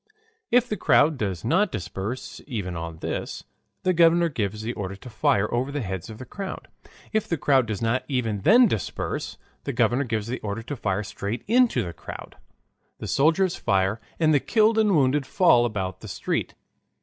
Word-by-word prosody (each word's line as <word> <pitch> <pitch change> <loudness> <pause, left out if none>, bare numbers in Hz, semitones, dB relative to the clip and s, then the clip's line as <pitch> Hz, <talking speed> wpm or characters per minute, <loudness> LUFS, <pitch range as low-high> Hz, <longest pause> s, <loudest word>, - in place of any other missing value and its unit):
If 245 0 +4
the 215 - -3
crowd 145 -1 +3
does 95 -5 -3
not 185 - +2
disperse 105 +4 -5
even 100 -9 -4
on 85 -1 -5
this, - - -4 0.4
the 185 - +2
governor 170 0 +4
gives 110 -5 -3
the 115 +2 -2
order 100 -2 -5
to 115 +6 -11
fire 105 -1 +2
over 125 +4 0
the 145 -2 -3
heads 95 +1 -5
of 110 - -8
the 130 - -8
crowd. 195 +5 -7 0.4
If 215 -1 +1
the 170 - -1
crowd 135 -4 +3
does 110 0 -3
not 115 +3 +1
even 115 -7 -1
then 235 - +6
disperse, 110 - -3 0.3
the - - -3
governor 120 +3 +2
gives 110 -3 -2
the 120 +3 -4
order 105 +2 -4
to 145 +5 -5
fire 100 -4 -1
straight 100 +3 -5
into 235 - +3
the 85 -2 -6
crowd; - - -10 0.6
the - - -7
soldiers 165 +5 +2
fire 95 +3 0 0.2
and 155 -1 +4
the 145 - +5
killed 220 - +3
and 210 -4 +3
wounded 135 -1 +2
fall 125 -11 +4
about 95 -5 -3
the - - -10
street. - - -3
120 Hz, 185 wpm, -25 LUFS, 105-165 Hz, 0.6 s, then